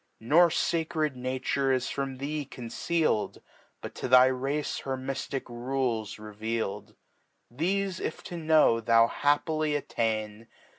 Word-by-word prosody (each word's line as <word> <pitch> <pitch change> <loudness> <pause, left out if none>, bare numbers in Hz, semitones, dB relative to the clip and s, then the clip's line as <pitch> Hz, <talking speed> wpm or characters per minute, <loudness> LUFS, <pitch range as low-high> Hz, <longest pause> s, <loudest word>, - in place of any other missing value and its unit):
Nor 160 +10 +5
facred 160 -2 0
Nature 130 +2 -1
is 130 -1 0
from 135 -1 -3
thee 145 +3 -3
conceal'd,. 130 +1 -1 0.4
But - - -7
xo - - -5
xhy 130 0 +6
Race 145 +2 -2
her 135 -1 -3
myftic 135 0 -4
Rules 120 -3 -2
reveal'd. 110 0 -4 0.6
Thefe 185 +6 -1
if - - -4
to 175 - -7
know 155 -8 +4
thou 115 0 +5
happily 150 +4 +1
attain. 110 -5 -2
135 Hz, 120 wpm, -28 LUFS, 115-155 Hz, 0.6 s, xhy